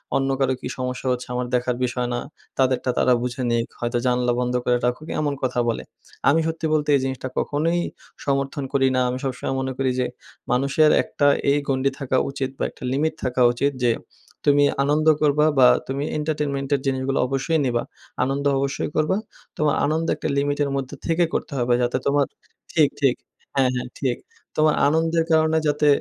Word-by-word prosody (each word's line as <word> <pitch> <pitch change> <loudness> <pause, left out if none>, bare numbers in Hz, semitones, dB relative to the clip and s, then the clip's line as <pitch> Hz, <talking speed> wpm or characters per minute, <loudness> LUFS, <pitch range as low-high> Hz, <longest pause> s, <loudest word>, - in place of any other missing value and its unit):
অন্য 135 0 +1
কারো 130 -1 +2
কী - - -4
সমস্যা 125 0 -3
হচ্ছে 125 0 -3
আমার 125 0 -2
দেখার 125 0 0
বিষয় 125 0 -2
না। 120 - -1 0.4
তাদেরটা 130 -1 +1
তারা 125 - +4
বুঝে 125 +1 -3
নিক 115 0 +1
হয়তো 120 0 -1
জানালা 125 -1 +2
বন্ধ 125 0 -1
করে 125 - +3
রাখুক 125 +6 -2
এমন 145 -1 0
কথা 125 -1 0
বলে। 115 - -2 0.5
আমি 150 +4 +4
সত্যি 160 0 -3
বলতে 150 -1 +1
এই - - +3
জিনিসটা 130 0 -3
কখনোই 165 +4 0 0.5
সমর্থন 140 0 -1
করি 135 -1 +3
না। - - +3
আমি 125 - -2
সবসময় 135 0 -2
মনে 130 0 -2
করি 130 -1 +1
যে, 125 - +2 0.5
মানুষের 140 +5 +3
একটা 145 - 0 0.2
এই 145 - +3
গণ্ডি 135 0 +1
থাকা 130 -1 0
উচিত 135 -1 -3
বা - - -2
একটা - - -14
লিমিট 155 +4 +1
থাকা 125 0 0
উচিত 140 +4 0
যে, 120 - +4 0.5
তুমি 145 0 +5 0.2
আনন্দ 150 +2 +1
করবা, 150 0 +3
বা 125 - +8 0.2
তুমি 135 +2 -2
এন্টারটেনমেন্ট 150 -3 -2
এর 135 - -3
জিনিসগুলো 135 0 0
অবশ্যই 135 +5 0
নিবা। 120 -2 0 0.4
আনন্দ 135 +2 -1
অবশ্যই 135 +1 -2
করবা, 155 +4 +2 0.4
তোমার 150 -1 +2
আনন্দ 160 +3 0
একটা - - -4
লিমিটের 145 0 +1
মধ্যে 135 +1 -4
থেকে 165 +1 +2
করতে - - -2
হবে। 120 0 +2
যাতে 120 0 +1
তোমার 140 0 +3 0.4
ঠিক, 155 -4 +4
ঠিক 135 -3 +4 0.4
হ্যাঁ, 130 -2 +3
হ্যাঁ, 125 0 -3
ঠিক। 130 -4 0 0.4
তোমার 155 0 +3
আনন্দের 165 +2 +2
কারণে 160 0 +4
যাতে 150 0 +2
135 Hz, 180 wpm, -23 LUFS, 125-150 Hz, 0.5 s, বা